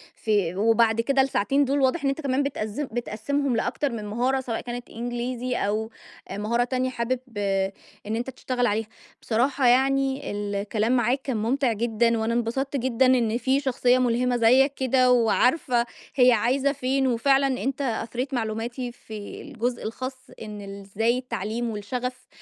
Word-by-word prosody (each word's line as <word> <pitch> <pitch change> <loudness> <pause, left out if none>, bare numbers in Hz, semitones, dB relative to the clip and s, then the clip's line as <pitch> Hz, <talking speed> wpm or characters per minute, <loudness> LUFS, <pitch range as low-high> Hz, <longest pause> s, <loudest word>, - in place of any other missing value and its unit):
في 200 -6 0
وبعد 225 +2 +3
كده 270 +3 +2
الساعتين 270 +2 +2
دول 275 +1 +1
واضح 275 +4 +2
إن 275 - +2
أنت 275 +3 -2
كمان 275 -1 +1
بتقذّم 275 -1 -3
بتقسّمهم 245 +4 -1
لأكتر 250 +5 -1
من 220 -3 -5
مهارة، 245 +6 0
سواء 235 -3 -3
كانت 245 0 -6
إنجليزي 245 +1 -3
أو 215 +2 -1 0.4
مهارة 215 +4 0
تانية 255 +1 -1
حابب 250 0 -2 0.9
إن 215 +2 -2
أنت 240 +3 -3
تشتغل 250 -1 -1
عليها. 215 +1 -1 0.3
بصراحة 255 +3 +1
يعني 270 +1 +2
ال 205 0 -3
الكلام 210 +3 0
معاك 245 +3 +1
كان 260 -4 -2
مُمتع 240 +2 +1
جدًا 230 +1 +1
وأنا 220 +1 0
انبسطت 240 +4 -1
جدًا 260 0 +2
إن 240 -3 +3
في 265 +2 +1
شخصية 255 -2 +2
مُلهمة 250 0 +1
زيّك 260 +5 +5
كده 255 -1 +3
وعارفة 245 +1 +3 0.3
هي 250 -1 +6
عايزة 255 +5 +2
فين، 265 0 0
وفعلًا 270 +2 +2
أنت 275 +2 -2
أثريت 245 +2 -2
معلوماتي 235 +2 -3
في 215 -3 -9
الجزء 245 -4 -3
الخاص 255 +3 -6
إن 210 -2 -7
ال 200 0 -8
إزاي 225 +5 0
التعليم 235 -1 -3
والشغف 250 +4 -4
245 Hz, 155 wpm, -25 LUFS, 225-265 Hz, 0.9 s, هي